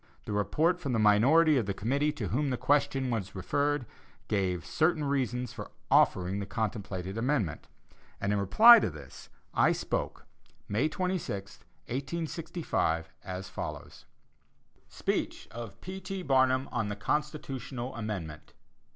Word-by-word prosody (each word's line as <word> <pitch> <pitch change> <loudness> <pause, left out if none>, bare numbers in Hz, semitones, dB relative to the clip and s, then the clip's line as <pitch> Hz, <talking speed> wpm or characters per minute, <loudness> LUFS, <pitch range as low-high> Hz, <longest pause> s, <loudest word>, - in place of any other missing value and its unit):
The 105 - -4
report 160 - +1
from 140 -8 -3
the - - +2
minority 135 +10 +5
of 115 -6 0
the 100 - -2
committee 140 +9 +1
to 105 - -4
whom 135 - 0
the 125 - -1
question 140 -2 +1
was 100 -5 -3
referred, 145 +8 0 0.4
gave 90 -4 0
certain 160 - +1
reasons 125 -4 -1
for - - -7 0.2
offering 95 +2 +3
the 100 - -4
contemplated 100 -3 -3
amendment, 115 - -1 0.5
and 100 +1 0
in 105 - +1
reply 225 - +8
to - - 0
this, 75 -5 -12 0.2
I - - +4
spoke, - - -3 0.4
May 120 +10 +1
26, 175 - -3 0.3
1865, 140 - -2
as 95 0 -6
follows: - - -7 0.8
SPEECH - - -2
OF 115 -2 -8
P. 190 +1 -7
T. 190 0 -5
BARNUM, 130 -1 +3
ON 110 -4 -1
THE 105 - -3
CONSTITUTIONAL 135 0 -3
AMENDMENT. 95 -10 -6
125 Hz, 135 wpm, -30 LUFS, 100-150 Hz, 0.8 s, reply